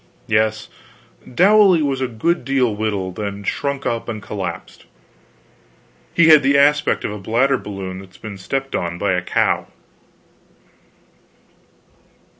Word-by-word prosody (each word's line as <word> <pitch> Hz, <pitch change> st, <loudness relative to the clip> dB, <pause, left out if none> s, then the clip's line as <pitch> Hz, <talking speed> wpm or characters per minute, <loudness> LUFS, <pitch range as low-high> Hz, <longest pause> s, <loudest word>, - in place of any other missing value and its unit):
Yes, 110 Hz, 0 st, 0 dB, 0.6 s
Dowley 190 Hz, -, +5 dB
was 135 Hz, -2 st, -1 dB
a 130 Hz, -, 0 dB
good 125 Hz, +9 st, -1 dB
deal 125 Hz, -4 st, +1 dB
wilted, 105 Hz, -2 st, -3 dB
and 100 Hz, 0 st, -5 dB
shrunk 140 Hz, +4 st, -2 dB
up 115 Hz, 0 st, -2 dB
and 110 Hz, -2 st, -4 dB
collapsed; 95 Hz, -5 st, -7 dB, 1.3 s
he 165 Hz, -1 st, +4 dB
had 155 Hz, -2 st, +8 dB
the 140 Hz, +1 st, +3 dB
aspect 145 Hz, +1 st, +3 dB
of -, -, -3 dB
a 105 Hz, -, -6 dB
bladder 125 Hz, +7 st, +1 dB
balloon 95 Hz, -2 st, -7 dB
that's 95 Hz, -1 st, -14 dB
been 105 Hz, -3 st, -9 dB
stepped 135 Hz, +8 st, -3 dB
on 85 Hz, 0 st, -3 dB
by 100 Hz, +2 st, 0 dB
a 90 Hz, -, 0 dB
cow. -, -, 0 dB
110 Hz, 130 wpm, -19 LUFS, 100-140 Hz, 1.3 s, had